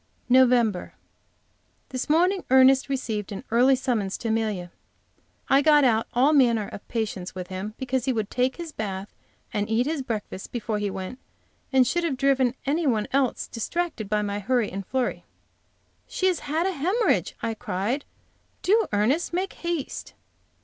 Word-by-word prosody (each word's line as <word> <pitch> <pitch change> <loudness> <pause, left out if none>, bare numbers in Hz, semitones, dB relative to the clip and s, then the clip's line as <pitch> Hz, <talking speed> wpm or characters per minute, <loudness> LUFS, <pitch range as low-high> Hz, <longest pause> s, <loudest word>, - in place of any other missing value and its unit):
NOVEMBER. 245 -6 +3 0.9
THIS 255 +1 -4
morning 360 +5 +3
Ernest 265 +1 +5
received 225 -7 -3
an 200 - -6
early 250 +3 +5
summons 230 -7 -1
to 230 - -4
Amelia. 215 -6 -1 0.8
I 275 +1 +5
got 295 0 +5
out 225 -3 +3
of - - -40
all 270 +5 +4
manner 235 -7 +3
of - - -10
patience 205 -6 -3
with 180 -1 -6
him 190 +3 -5
because 260 -1 -2
he 265 - +2
would 220 -4 -2
take 255 +1 +1
his 340 -2 -7
bath 200 -5 -5 0.4
and 205 0 -1
eat 225 +3 +2
his 305 -1 -1
breakfast 215 -6 -5
before 225 -3 -2
he 205 -1 -1
went, 190 +6 -6 0.5
and 260 -2 +5
should 345 +7 0
have 300 -6 -1
driven 260 -2 +2
any 305 +3 +1
one 220 -5 +1
else 270 -2 +1
distracted 240 - -3
by 210 0 +1
my 205 0 -2
hurry 235 +1 0
and 195 0 -6
flurry. 260 -2 -1 0.8
"She 375 - -2
has 365 -3 +2
had 315 +4 -1
a 385 - +1
hemorrhage!" 375 - +1
I 230 -1 0
cried. 215 +7 -2 0.6
"Do, 430 +2 +3
Ernest, 240 +13 +1
make 375 +2 -1
haste." 340 -5 -4
250 Hz, 165 wpm, -25 LUFS, 210-280 Hz, 0.9 s, Ernest